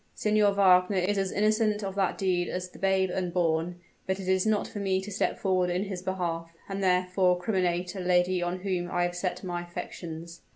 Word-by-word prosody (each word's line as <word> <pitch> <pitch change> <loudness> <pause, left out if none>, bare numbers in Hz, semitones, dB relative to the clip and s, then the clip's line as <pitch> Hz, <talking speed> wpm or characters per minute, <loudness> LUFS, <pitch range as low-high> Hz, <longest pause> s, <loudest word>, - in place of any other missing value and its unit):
Signor 210 -1 +3
Wagner 190 0 +4
is 195 +2 +1
as 195 -1 -1
innocent 215 0 +1
of 195 -1 -3
that 195 -2 0
deed 180 -2 0
as 180 0 -4
the - - -14
babe 190 -1 +2
unborn; 175 -1 0 0.3
but 190 +1 -1
it 190 - -6
is 190 +2 +2
not 215 -1 +1
for 205 - -7
me 190 -1 +1
to 195 +2 -7
step 200 - 0
forward 185 -2 +1
in 180 +2 0
his 190 -3 -5
behalf, 175 -3 -3 0.2
and 195 0 -4
thereby 180 0 +3
criminate 180 -2 0
a 195 - -6
lady 180 0 +2
on 175 +1 -2
whom 180 -2 -2
I 175 0 0
have 175 0 -1
set 180 +2 -3
my 175 -2 -3
affections." 170 -1 -7
185 Hz, 205 wpm, -28 LUFS, 175-195 Hz, 0.3 s, Wagner